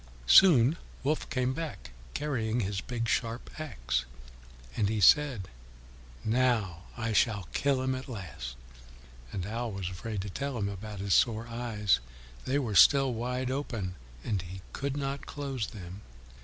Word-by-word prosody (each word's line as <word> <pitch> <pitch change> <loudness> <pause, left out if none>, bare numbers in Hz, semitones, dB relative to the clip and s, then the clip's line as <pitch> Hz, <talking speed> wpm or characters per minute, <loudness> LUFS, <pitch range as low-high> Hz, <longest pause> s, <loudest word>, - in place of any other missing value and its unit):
Soon 150 - +7 0.3
Wolf 150 +3 0
came 130 0 0
back, 140 - -6 0.2
carrying 120 -6 0
his 95 -1 -2
big 115 -2 -3
sharp 115 +1 -1
axe. 60 - -2 0.7
And 100 - +1
he 110 0 0
said, 130 -2 +5 0.8
"Now 110 -7 +1
I 115 -1 -1
shall 105 -3 +2
kill 140 -2 +1
him 130 0 +1
at 130 +1 -6
last." 70 - -6 0.8
And 90 - -3
Owl 115 +2 -3
was 95 -2 -3
afraid 105 +3 -4
to 100 - -5
tell 140 +3 -3
him 100 -2 -1
about 100 0 -6
his 100 -1 +1
sore 115 -1 +3
eyes; 115 - +1 0.5
they 135 +2 +1
were 125 -7 -1
still 135 +6 +7
open 120 - -2 0.4
wide, 105 -10 -4 0.3
and 100 -4 -1
he 90 +2 -8
could 140 0 -2
not 140 0 -3
close 135 -7 -3
them. 95 -1 -9
115 Hz, 150 wpm, -30 LUFS, 100-130 Hz, 0.8 s, Soon